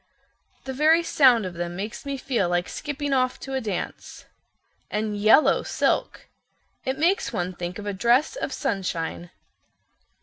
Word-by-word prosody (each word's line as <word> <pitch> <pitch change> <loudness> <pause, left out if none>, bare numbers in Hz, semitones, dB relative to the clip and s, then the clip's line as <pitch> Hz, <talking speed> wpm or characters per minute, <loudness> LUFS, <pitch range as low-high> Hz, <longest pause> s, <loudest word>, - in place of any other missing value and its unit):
"The 265 - -5
very 315 +5 +4
sound 255 - +4
of 185 - -5
them 175 0 -4
makes 210 +8 -6
me 280 -1 -2
feel 240 -9 0
like 175 0 0
skipping 290 -1 -3
off 255 -1 +1
to 270 - -6
a 265 - -1
dance. 205 -6 -5 0.6
And 210 0 -2
yellow 215 +8 +5
silk. - - -1 0.6
It 260 +1 -2
makes 345 +6 +1
one 180 +1 -2
think 175 0 -5
of 205 - -7
a 205 - -2
dress 240 - +2
of - - -3
sunshine. 175 -4 -3
230 Hz, 155 wpm, -25 LUFS, 185-275 Hz, 0.6 s, yellow